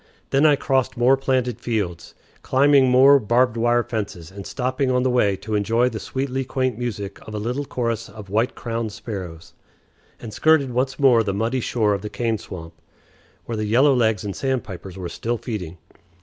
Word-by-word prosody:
Then 140 +3 +4
I 150 - +5
crossed 135 -3 0
more 125 +3 +5
planted 130 -3 -1
fields, 100 -9 -3 0.3
climbing 135 0 +4
more 135 +3 +7
barbed 120 +2 +2
wire 120 +1 +2
fences, 100 -8 -5
and 100 0 -9
stopping 130 +1 -1
on 125 0 +2
the 130 - +1
way 105 -6 +2
to 110 +3 -7
enjoy 115 +4 +2
the 110 -3 -6
sweetly 135 +2 -3
quaint 130 -2 -1
music 105 -4 -5
of 110 - -7
a - - -2
little 125 +7 -3
chorus 115 -4 -3
of 105 -3 -11
white 110 +5 0
crowned 115 -2 -3
sparrows, 90 -8 -8 0.7
and 110 -2 -8
skirted 155 0 +3
once 130 +2 -1
more 130 -5 +5
the 100 -3 -2
muddy 115 +5 0
shore 110 -3 +1
of 100 - -2
the 105 - -5
cane 115 0 -1
swamp, 85 -4 -9 0.7
where 115 - -4
the 110 - -2
yellowlegs 120 -5 +3
and 100 -2 -4
sandpipers 100 -9 -4
were 90 -2 -5
still 115 +8 -3
feeding. 95 -8 -6
120 Hz, 180 wpm, -22 LUFS, 105-130 Hz, 0.7 s, more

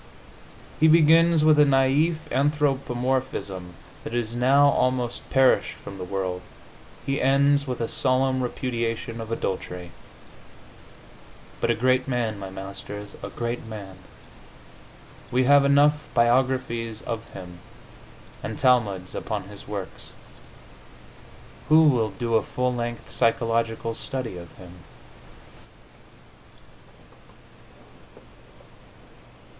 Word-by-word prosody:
He 160 - +5
begins 165 0 +5
with 155 -1 +5
a - - +8
naif 140 +4 +3 0.2
anthropomorphism 130 - -1 0.3
that 115 - -5
is 120 -1 -2
now 135 +4 +5
almost 125 -3 -1
perished 135 -1 +3
from 100 -1 -10
the - - -4
world; 90 -1 -3 0.6
he 135 0 -1
ends 140 +1 +3
with 125 -2 -3
a 115 - -1
solemn 130 +1 +1
repudiation 115 -2 -3
of 110 0 -8
adultery.... 90 -5 -4 1.7
But - - 0
a - - +3
great 130 +2 +1
man, 115 -5 -1
my 95 -1 -6
masters, 100 +2 -8
a - - -6
great 120 0 -4
man! 100 -4 -9 1.3
We 130 +1 +2
have 140 +2 +6
enough 145 +2 +3
biographies 120 -2 +1
of 115 -1 -5
him, 90 -2 -10 0.8
and 110 - -5
talmuds 105 -8 +1
upon 95 - -4
his 100 -1 -11
works. 100 -2 -7 1.6
Who 155 +1 +7
will 125 -8 +3
do 115 +4 -4
a 110 - +4
full 125 +4 -2
length 120 -1 -5
psychological 115 -1 0
study 130 -4 -5
of 85 -1 -10
him? 90 -2 -12
120 Hz, 105 wpm, -24 LUFS, 105-135 Hz, 1.7 s, a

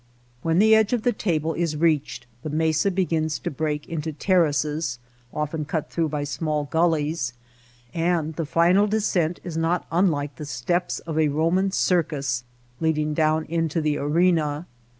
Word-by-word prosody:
When 165 +2 +1
the 220 +3 +6
edge 220 +1 +4
of 235 -3 0
the 245 - +2
table 165 -6 -1
is 165 -2 -1
reached 150 -6 0 0.2
the 155 - -5
mesa 160 +4 +1
begins 165 -5 0
to - - -4
break 150 0 -2
into 160 -1 -3
terraces 150 -4 +1 0.3
(often 150 +1 -2
cut 155 0 -3
through 165 -2 0
by 150 -1 -2
small 150 +1 -2
gullies), 155 -4 0 0.6
and 165 -2 0
the 165 -2 -3
final 175 +6 +4
descent 185 -6 0
is 170 -3 -5
not 165 +2 0
unlike 150 -6 +1
the 150 - -6
steps 175 +7 -1
of 160 -2 -5
a 155 -1 +4
Eoman 165 +6 +1
circus 145 -10 0 0.4
leading 155 -2 0
down 155 0 +1
into 165 0 -1
the 150 -1 0
arena. 155 0 +1
160 Hz, 155 wpm, -24 LUFS, 150-170 Hz, 0.6 s, the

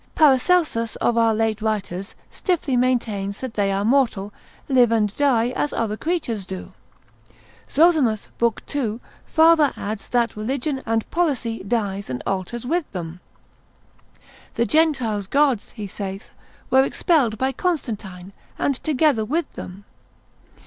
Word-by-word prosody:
Paracelsus 290 -5 +3
of 240 - +1
our 230 -1 +3
late 220 -1 0
writers 200 -3 -3 0.2
stiffly 320 -7 -1
maintains 225 -6 0
that 260 -3 -5
they 200 -2 +1
are 195 +1 0
mortal, 225 -5 +1 0.3
live 250 -4 +4
and 210 -3 +1
die 245 -5 +2
as 290 +3 -2
other 220 -2 -1
creatures 235 - -2
do. 190 -1 -7 1.0
Zozimus, 290 -9 +3
l. 235 -2 +3
2, 235 -6 -2 0.3
farther 320 -3 +5
adds, 205 0 -5
that 240 -1 +1
religion 265 +5 -2
and 225 0 0
policy 270 - -1
dies 200 -2 -2
and 125 -1 -4
alters 195 +5 -3
with 330 +3 -1
them. 175 -1 -6 1.3
The 235 - +2
Gentiles' 240 -7 +1
gods, 275 -3 +2
he 210 - -6
saith, 195 0 -7 0.4
were 265 +1 +6
expelled 270 -6 +1
by 265 +4 0
Constantine, 210 - -3 0.2
and 280 - +1
together 290 -5 +2
with 300 +8 -2
them. 195 +3 -9
230 Hz, 130 wpm, -22 LUFS, 205-280 Hz, 1.3 s, were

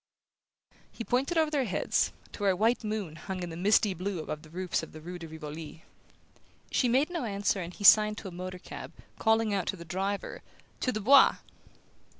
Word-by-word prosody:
He 230 - -6
pointed 265 +9 0
over 315 -1 +3
their 280 -4 +1
heads, 195 - 0 0.2
to - - -10
where 195 -2 +3
a - - -3
white 225 +5 +2
moon 210 -7 -4
hung 185 0 -5
in 175 - -5
the - - -6
misty 200 +3 +3
blue 185 +2 -3
above 155 -1 -5
the 155 - -15
roofs 180 +2 -2
of 160 - -10
the 155 - -9
rue 175 +3 -8
de 165 - -8
Rivoli. 155 0 -8 0.9
She 255 - +2
made 270 +7 +2
no 340 -5 -2
answer, 200 -2 -1
and 170 0 -6
he 205 - -10
signed 210 +1 +7
to 205 - -7
a - - -7
motor 185 +1 -6
cab, 180 - -9 0.3
calling 220 -1 +2
out 195 -3 -1
to - - -1
the 170 -2 -10
driver: 195 +4 -3 0.4
"To 255 - 0
the 215 - -3
Bois!" 270 +6 +7
195 Hz, 205 wpm, -29 LUFS, 175-220 Hz, 0.9 s, signed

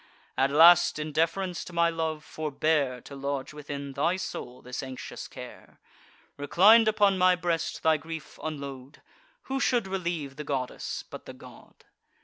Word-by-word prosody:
At 135 - +2
last, 170 +4 +7
in 155 0 -4
deference 170 +4 0
to 180 - -11
my 170 0 +3
love, 160 -2 -3
forbear 150 -4 -1
To 140 - -11
lodge 140 +1 -4
within 140 -1 -6
thy 160 +6 +1
soul 125 -8 -6
this 125 +1 -5
anxious 130 -1 -7
care; - - -12 0.6
Reclin'd 210 +10 +6
upon 205 -3 +3
my 185 0 +5
breast, 170 -2 -2
thy 160 -1 +4
grief 160 0 -9
unload: 140 -3 -7 0.4
Who 270 0 -3
should 245 -6 +1
relieve 170 -7 -3
the 150 - -5
goddess, 135 -4 -4
but - - -9
the - - -8
god? - - -16
155 Hz, 150 wpm, -28 LUFS, 140-175 Hz, 0.6 s, last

